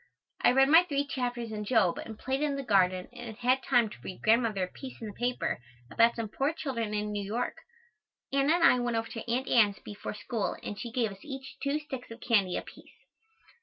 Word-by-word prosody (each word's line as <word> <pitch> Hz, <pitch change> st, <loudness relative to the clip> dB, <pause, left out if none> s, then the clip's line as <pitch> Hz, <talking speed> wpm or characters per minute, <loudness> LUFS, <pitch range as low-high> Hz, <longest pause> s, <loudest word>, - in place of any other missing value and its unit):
I -, -, +6 dB
read 270 Hz, +1 st, +5 dB
my 325 Hz, +4 st, +8 dB
three 285 Hz, -5 st, -1 dB
chapters 245 Hz, -4 st, -3 dB
in 210 Hz, -1 st, -4 dB
Job 205 Hz, -5 st, +2 dB
and 220 Hz, -1 st, -7 dB
played 265 Hz, +4 st, -2 dB
in 295 Hz, -2 st, +1 dB
the 275 Hz, -, -3 dB
garden 185 Hz, -5 st, +2 dB
and 240 Hz, -3 st, -8 dB
had 255 Hz, +2 st, +2 dB
time 245 Hz, -4 st, +3 dB
to 210 Hz, -, -11 dB
read 185 Hz, -, -8 dB
Grandmother 220 Hz, -3 st, +3 dB
a -, -, -1 dB
piece 260 Hz, +7 st, -10 dB
in 225 Hz, -, -6 dB
the -, -, -9 dB
paper 245 Hz, -, -1 dB, 0.3 s
about 230 Hz, 0 st, +4 dB
some 230 Hz, -1 st, -3 dB
poor 275 Hz, +8 st, -1 dB
children 230 Hz, -9 st, -3 dB
in 210 Hz, 0 st, -2 dB
New 205 Hz, -1 st, -2 dB
York. 225 Hz, +5 st, -2 dB, 0.8 s
Anna 275 Hz, +3 st, +4 dB
and 345 Hz, -, +1 dB
I 250 Hz, -, +6 dB
went 240 Hz, -1 st, 0 dB
over 225 Hz, 0 st, -2 dB
to 230 Hz, 0 st, -5 dB
Aunt 255 Hz, +2 st, 0 dB
Ann's 210 Hz, -4 st, +4 dB
before 205 Hz, 0 st, -7 dB
school 215 Hz, 0 st, -2 dB
and 205 Hz, -, -5 dB
she 235 Hz, -, -5 dB
gave 230 Hz, -3 st, 0 dB
us 195 Hz, -, -11 dB
each 270 Hz, -1 st, -8 dB
two 280 Hz, +1 st, +1 dB
sticks 265 Hz, -4 st, -7 dB
of 230 Hz, +1 st, -9 dB
candy 200 Hz, -8 st, +2 dB
apiece. -, -, -10 dB
235 Hz, 220 wpm, -30 LUFS, 210-265 Hz, 0.8 s, my